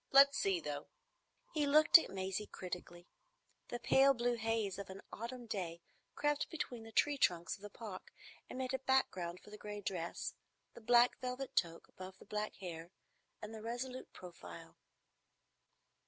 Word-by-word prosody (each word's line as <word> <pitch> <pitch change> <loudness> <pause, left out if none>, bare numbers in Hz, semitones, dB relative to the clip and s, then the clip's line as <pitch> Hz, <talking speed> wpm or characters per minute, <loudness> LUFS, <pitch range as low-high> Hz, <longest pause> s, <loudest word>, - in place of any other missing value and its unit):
Let's 275 0 +7
see, 195 -6 +2
though." 145 -2 -4 0.7
He 300 -2 +2
looked 305 +3 +9
at - - -5
Maisie 190 +2 -3
critically. 175 -1 -7 0.6
The 240 - -3
pale 270 +3 +5
blue 240 0 +1
haze 220 -4 -1
of 200 - -6
an 190 +1 -8
autumn 240 +2 -5
day 180 -6 -3 0.4
crept 295 -1 +1
between 275 -7 -4
the 225 0 -10
tree 285 +5 +3
trunks 175 -4 +2
of - - -18
the 205 - -7
Park 205 -3 -8 0.4
and - - -6
made 260 0 -2
a 265 - 0
background 185 -10 +1
for 210 - -15
the 210 - -9
gray 210 0 -5
dress, 180 -4 -3 0.4
the - - -12
black 240 +2 +5
velvet 255 +1 -4
toque 165 -2 0
above 185 0 -10
the - - -15
black 210 +1 -3
hair, 170 -3 -7 0.5
and 215 +1 -6
the 220 - -7
resolute 245 +3 -4
profile. 170 - -10
215 Hz, 165 wpm, -37 LUFS, 185-255 Hz, 0.7 s, looked